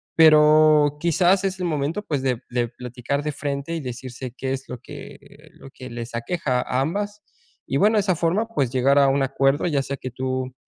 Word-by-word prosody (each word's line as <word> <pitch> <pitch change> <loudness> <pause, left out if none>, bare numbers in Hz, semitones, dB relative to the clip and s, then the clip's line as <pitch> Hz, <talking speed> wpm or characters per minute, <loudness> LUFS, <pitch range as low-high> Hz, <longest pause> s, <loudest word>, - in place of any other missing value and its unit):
pero, 155 -1 +6
quizás 180 +4 +2
es 190 -1 -2
el 180 - -2
momento, 160 +4 -2
pues, 145 -8 -2
de 125 -3 -1
de 120 -1 -1
platicar 125 +3 -4
de 150 - -2
frente 140 +2 -4
y 165 - -4
decirse 125 0 -7
que 130 +1 -5
es 135 0 -6
lo 125 - -6
que 120 - -13
lo 135 - -14
que 130 -1 -10
les 120 0 -7
aqueja 125 +1 -1
a 130 +1 -1
ambas 205 +7 -3 0.5
y 135 - 0
bueno, 210 +6 +3
de - - +4
esa 190 -2 0
forma, 180 +8 0
pues, 140 - -1
llegar 135 +2 +2
a 140 - +5
un 135 +1 +1
acuerdo, 135 +4 +1
ya 140 -4 0
sea 140 0 -5
que 130 - -6
tú 130 0 -3
140 Hz, 210 wpm, -23 LUFS, 130-165 Hz, 0.5 s, pero